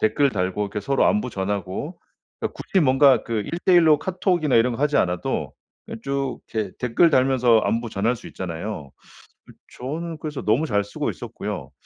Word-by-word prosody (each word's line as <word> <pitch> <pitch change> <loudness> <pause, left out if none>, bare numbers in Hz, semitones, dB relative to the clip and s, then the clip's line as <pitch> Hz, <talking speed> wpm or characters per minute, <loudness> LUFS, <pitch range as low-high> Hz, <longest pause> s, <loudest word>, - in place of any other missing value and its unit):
댓글 135 +6 +2
달고 95 -1 -1
이렇게 100 +1 -4
서로 135 +6 +1
안부 210 +1 +1
전하고 100 - -4 0.4
그니까 - - -2
굳이 190 - 0
뭔가 135 -4 +5
그 115 -2 -2
1:1 175 0 +4
로 150 -1 +6
카톡이나 180 - +1
이런 120 +2 +3
거 130 - -3
하지 150 0 +2
않아도 90 -1 -1 0.3
그냥 115 - -8
쭉 140 -1 -2
이렇게 105 -4 -2
댓글 125 +7 +3
달면서 130 -4 +4
안부 115 +2 -1
전할 110 +5 0
수 - - -13
있잖아요. 85 -3 -6 0.6
그 - - -14 0.3
저는 160 +6 -4
그래서 150 -3 -5
너무 115 +8 +2
잘 105 -7 +1
쓰고 100 - -3
있었고요. - - -6
125 Hz, 355 characters per minute, -23 LUFS, 105-150 Hz, 0.6 s, 로